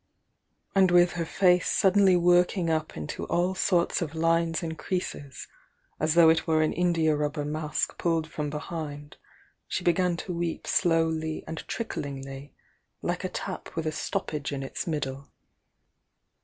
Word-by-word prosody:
And 190 -2 +5
with 175 0 +5
her 170 -2 -3
face 180 +1 +3
suddenly 190 -1 +4
working 175 0 +3
up 155 0 -2
into 75 -1 -5
all 180 +2 +1
sorts 175 -2 +1
of 160 -2 -4
lines 165 0 +1
and 160 -1 -3
creases 155 -7 -4 0.5
as 155 +1 +1
though 170 -2 +8
it 160 0 +2
were 160 -1 +3
an 155 - 0
india 165 -3 +2
rubber 150 0 -2
mask 150 0 -2
pulled 165 -2 +1
from 150 -2 -4
behind, 150 -1 -6 0.5
she - - -3
began 175 0 +2
to 180 - -5
weep 170 -1 -3
slowly 160 -2 +1
and 160 0 -5
tricklingly, 135 -8 -5 0.5
like - - -2
a - - -2
tap - - -6
with 165 -1 -2
a 155 - 0
stoppage 150 -2 -3
in 140 -1 -3
its 135 - -5
middle. 140 -3 -3
160 Hz, 150 wpm, -27 LUFS, 150-175 Hz, 0.5 s, though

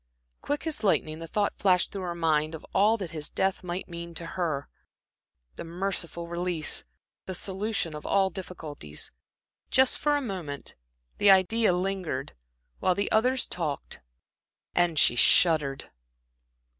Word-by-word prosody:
Quick 290 +2 -2
as 310 -6 -2
lightning 160 -6 +1
the 165 - -7
thought 205 +4 -1
flashed 185 -2 +3
through 195 - -5
her 175 -2 -3
mind 160 -1 +1
of 160 - -10
all 215 +4 +4
that 185 -6 -5
his 155 -2 -5
death 190 0 0
might 180 +1 -4
mean 170 -1 -7
to 170 - -4
her 160 -6 -2 0.9
the - - -5
merciful 170 -1 -2
release, 170 -2 -1 0.4
the 185 - -3
solution 195 -2 -1
of 150 - -7
all 195 -1 +2
difficulties.... 155 - -6 0.6
Just 265 -1 +4
for 295 0 +2
a - - 0
moment 180 - -5 0.5
the 205 - +5
idea 195 +3 +5
lingered, 180 -7 -2 0.5
while 185 - +2
the 200 - -1
others 250 +4 +3
talked, 155 -5 -4 0.7
and 175 -2 +2
she 120 - +6
shuddered. 145 0 +3
180 Hz, 145 wpm, -28 LUFS, 160-195 Hz, 0.9 s, she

